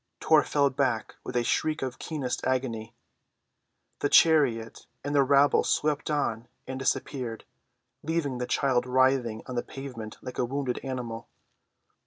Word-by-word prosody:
Tor 155 Hz, -1 st, +5 dB
fell 140 Hz, -2 st, +2 dB
back 130 Hz, -5 st, -1 dB
with 125 Hz, -, -7 dB
a 120 Hz, -, +2 dB
shriek 155 Hz, +4 st, 0 dB
of 130 Hz, -1 st, -4 dB
keenest 140 Hz, -6 st, -3 dB
agony. 120 Hz, -3 st, -2 dB, 1.0 s
The 145 Hz, -, 0 dB
chariot 135 Hz, -10 st, +3 dB, 0.2 s
and 145 Hz, +1 st, -3 dB
the 145 Hz, -, +5 dB
rabble 140 Hz, +1 st, +4 dB
swept 150 Hz, 0 st, 0 dB
on 120 Hz, -6 st, -1 dB, 0.2 s
and 130 Hz, 0 st, -5 dB
disappeared, 125 Hz, -3 st, -2 dB, 0.6 s
leaving 145 Hz, -5 st, -1 dB
the 125 Hz, -, -2 dB
child 125 Hz, -1 st, +1 dB
writhing 130 Hz, -3 st, +2 dB
on 130 Hz, -, -7 dB
the 120 Hz, -, 0 dB
pavement 120 Hz, -6 st, -8 dB
like 125 Hz, -, -7 dB
a 125 Hz, -, +2 dB
wounded 130 Hz, 0 st, -2 dB
animal. 125 Hz, -4 st, -5 dB
130 Hz, 145 wpm, -28 LUFS, 120-140 Hz, 1.0 s, Tor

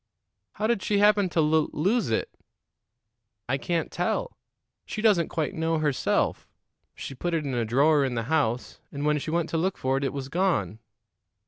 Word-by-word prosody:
"How 215 Hz, -, -3 dB
did 230 Hz, -3 st, +1 dB
she 205 Hz, -, 0 dB
happen 205 Hz, -2 st, +4 dB
to 170 Hz, -, +1 dB
lul 155 Hz, 0 st, +2 dB
lose 195 Hz, -, +1 dB
it?" 110 Hz, -, -2 dB, 1.1 s
"I 135 Hz, +3 st, 0 dB
can't 170 Hz, +2 st, -2 dB
tell. -, -, -2 dB, 0.5 s
She -, -, -5 dB
doesn't 205 Hz, -7 st, +3 dB
quite 155 Hz, -3 st, -2 dB
know 160 Hz, 0 st, 0 dB
herself. 150 Hz, -4 st, 0 dB, 0.5 s
She -, -, -7 dB
put 170 Hz, +6 st, -2 dB
it 155 Hz, -2 st, -1 dB
in 135 Hz, -, -3 dB
a 120 Hz, -2 st, 0 dB
drawer 140 Hz, +6 st, +3 dB
in 130 Hz, -2 st, -1 dB
the 115 Hz, -, -1 dB
house, 130 Hz, -3 st, -1 dB
and 145 Hz, +1 st, -4 dB
when 150 Hz, 0 st, +2 dB
she 150 Hz, -, -5 dB
went 165 Hz, 0 st, 0 dB
to 165 Hz, -, 0 dB
look 185 Hz, +3 st, -1 dB
for 130 Hz, +1 st, 0 dB
it, 135 Hz, -, -2 dB
it 135 Hz, -, 0 dB
was 135 Hz, -2 st, -5 dB
gone." 140 Hz, -, 0 dB
155 Hz, 190 wpm, -26 LUFS, 135-175 Hz, 1.1 s, happen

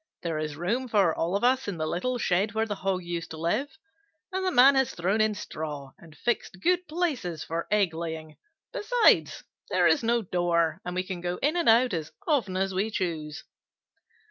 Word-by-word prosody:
There 165 Hz, -3 st, -2 dB
is 155 Hz, -1 st, -3 dB
room 220 Hz, -, -1 dB
for 200 Hz, -8 st, +3 dB
all 170 Hz, +3 st, -1 dB
of 200 Hz, -, -1 dB
us 255 Hz, +2 st, +2 dB
in 200 Hz, -4 st, -3 dB
the 155 Hz, -, -2 dB
little 215 Hz, +11 st, -1 dB
shed 200 Hz, 0 st, 0 dB
where 220 Hz, 0 st, +1 dB
the 210 Hz, -, -3 dB
Hog 190 Hz, -2 st, -2 dB
used 170 Hz, -1 st, -4 dB
to 160 Hz, -, -8 dB
live, 230 Hz, -, -1 dB, 0.5 s
and 380 Hz, 0 st, -2 dB
the 375 Hz, -, +2 dB
Man 275 Hz, -4 st, +7 dB
has 265 Hz, -1 st, +1 dB
thrown 190 Hz, +5 st, +1 dB
in 215 Hz, -1 st, +2 dB
straw 150 Hz, -6 st, -6 dB
and 160 Hz, -3 st, -16 dB
fixed 235 Hz, -5 st, -2 dB
good 360 Hz, -, +1 dB
places 295 Hz, -, -2 dB
for 165 Hz, +1 st, -4 dB
egg 205 Hz, -5 st, +2 dB
laying. 160 Hz, -1 st, -6 dB, 0.4 s
Besides, -, -, +3 dB, 0.3 s
there -, -, +2 dB
is 295 Hz, -, +4 dB
no 235 Hz, 0 st, +1 dB
door, 170 Hz, -2 st, 0 dB
and 180 Hz, 0 st, -5 dB
we 185 Hz, -, 0 dB
can 185 Hz, -2 st, -6 dB
go 175 Hz, 0 st, -2 dB
in 300 Hz, +4 st, +2 dB
and 340 Hz, -7 st, +2 dB
out 235 Hz, 0 st, +5 dB
as 160 Hz, -3 st, -3 dB, 0.2 s
often 235 Hz, -, +1 dB
as 190 Hz, 0 st, 0 dB
we 195 Hz, +4 st, 0 dB
choose." 160 Hz, -6 st, -3 dB
190 Hz, 200 wpm, -27 LUFS, 170-245 Hz, 0.5 s, Man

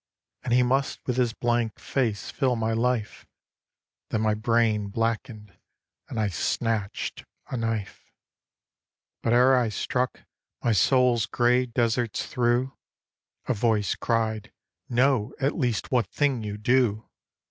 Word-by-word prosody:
And 120 Hz, -, -4 dB
he 125 Hz, +1 st, +5 dB
must 135 Hz, +2 st, 0 dB
with 125 Hz, -1 st, -1 dB
his 125 Hz, -2 st, +2 dB
blank 120 Hz, -2 st, -1 dB
face 115 Hz, -7 st, -2 dB
fill 130 Hz, -3 st, +1 dB
my 115 Hz, -1 st, -1 dB
life 115 Hz, -1 st, -1 dB, 0.8 s
Then 110 Hz, -, -1 dB
my 110 Hz, -1 st, +2 dB
brain 110 Hz, -1 st, +1 dB
blackened; 110 Hz, -2 st, -3 dB, 0.5 s
and 115 Hz, -, -4 dB
I 105 Hz, -, +2 dB
snatched 100 Hz, +4 st, -2 dB, 0.3 s
a -, -, -2 dB
knife. 115 Hz, -4 st, -4 dB, 1.1 s
But 115 Hz, -, +1 dB
ere 125 Hz, +2 st, +6 dB
I 125 Hz, -3 st, +2 dB
struck, 125 Hz, +4 st, -2 dB, 0.4 s
my 120 Hz, -, +2 dB
soul's 120 Hz, +2 st, +3 dB
grey 125 Hz, +1 st, +2 dB
deserts 115 Hz, -1 st, 0 dB
through 125 Hz, +2 st, 0 dB, 0.7 s
A 130 Hz, -, +2 dB
voice 110 Hz, -2 st, +1 dB
cried, 110 Hz, -2 st, -1 dB, 0.4 s
'Know 125 Hz, -2 st, +2 dB
at 140 Hz, +1 st, 0 dB
least 120 Hz, -, -1 dB
what 120 Hz, -6 st, +2 dB
thing 140 Hz, -5 st, 0 dB
you 105 Hz, -1 st, -5 dB
do.' 115 Hz, -1 st, +1 dB
115 Hz, 130 wpm, -26 LUFS, 110-125 Hz, 1.1 s, ere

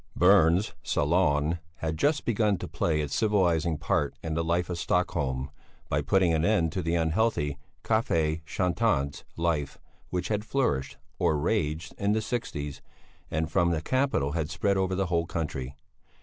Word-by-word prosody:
Berns' 90 Hz, +1 st, +4 dB
"Salon" 75 Hz, 0 st, +1 dB, 0.2 s
had 80 Hz, -1 st, -3 dB
just 145 Hz, -, +1 dB
begun 105 Hz, -3 st, +2 dB
to -, -, -6 dB
play 75 Hz, -2 st, 0 dB
its 75 Hz, -2 st, -3 dB
civilizing 85 Hz, -7 st, +2 dB
part 70 Hz, -1 st, 0 dB
in 80 Hz, -1 st, -3 dB
the 80 Hz, +1 st, 0 dB
life 85 Hz, +2 st, 0 dB
of 85 Hz, -, -3 dB
Stockholm 70 Hz, -8 st, -1 dB, 0.4 s
by -, -, +1 dB
putting 95 Hz, -3 st, +3 dB
an 80 Hz, 0 st, +1 dB
end 85 Hz, -5 st, +2 dB
to 95 Hz, -, -2 dB
the 85 Hz, 0 st, 0 dB
unhealthy 80 Hz, -4 st, +1 dB, 0.2 s
café 85 Hz, -8 st, +1 dB
chantants 90 Hz, -4 st, 0 dB
life 80 Hz, -4 st, -1 dB, 0.3 s
which 90 Hz, 0 st, -2 dB
had 105 Hz, -1 st, 0 dB
flourished 70 Hz, -, -1 dB, 0.2 s
or 75 Hz, -, +2 dB
raged 80 Hz, -1 st, -1 dB
in 100 Hz, +1 st, +2 dB
the 110 Hz, -, +1 dB
sixties, 75 Hz, -, -4 dB, 0.5 s
and 80 Hz, 0 st, -2 dB
from 85 Hz, 0 st, +3 dB
the 85 Hz, -2 st, +1 dB
capital 130 Hz, -, 0 dB
had 80 Hz, -1 st, -2 dB
spread 85 Hz, +5 st, 0 dB
over 95 Hz, -1 st, 0 dB
the 95 Hz, +1 st, 0 dB
whole 85 Hz, -2 st, 0 dB
country. 70 Hz, -6 st, -4 dB
85 Hz, 160 wpm, -28 LUFS, 75-95 Hz, 0.5 s, Berns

